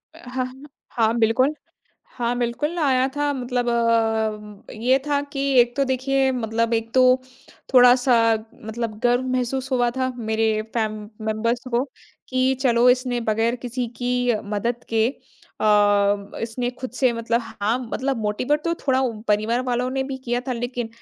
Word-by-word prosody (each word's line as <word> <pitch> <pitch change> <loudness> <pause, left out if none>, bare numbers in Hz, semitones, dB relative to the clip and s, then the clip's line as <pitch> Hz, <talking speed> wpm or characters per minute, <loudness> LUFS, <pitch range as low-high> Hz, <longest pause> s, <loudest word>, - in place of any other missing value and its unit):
अ, - - -14
हाँ, 255 0 -2
हाँ। 265 +3 -12 0.2
हाँ, 225 0 +1
बिल्कुल। 245 +6 +3 0.6
हाँ, 240 -1 -1
बिल्कुल 270 +8 -2
आया 265 -4 +3
था 290 0 +1
मतलब 245 -2 -2
अ, 220 -3 0
ये 250 +5 +2
था 290 -1 +1
कि 275 - -3 0.2
एक 240 0 +2
तो 280 - +2
देखिए, 265 +1 +1
मतलब 230 -1 -1
एक 225 0 -2
तो 260 - +6 0.7
थोड़ा-सा 250 0 +6 0.5
मतलब 220 -1 -4
गर्व 245 +1 +3
महसूस 260 +2 -2
हुआ 245 -1 +2
था 260 0 0
मेरे 220 -1 0 0.2
फ़ैम 215 -2 -1 0.3
मेंबर्स 230 +3 0
को 240 +2 +1 0.4
कि, 255 0 +2
चलो, 240 -2 +4
इसने 250 -1 0
बगैर 225 +3 +1
किसी 245 +1 -2
की 245 +1 0
अ, 215 -3 0
मदद 225 +4 -2
के 225 0 +2 0.5
अ, - - -1 0.8
इसने 235 +2 -2
खुद 255 - -5
से 255 -1 +2
मतलब 230 0 0
हाँ, 225 +1 -2
मतलब 270 0 -1
मोटिवेट 250 +8 0
तो 335 - +1
थोड़ा 260 -1 +3
उ 235 -5 -2
परिवार 215 +3 +2
वालों 250 0 0
ने 265 0 -1
भी 265 0 -5
किया 240 0 0
था - - 0
लेकिन 245 -1 -3
245 Hz, 165 wpm, -23 LUFS, 225-255 Hz, 0.8 s, तो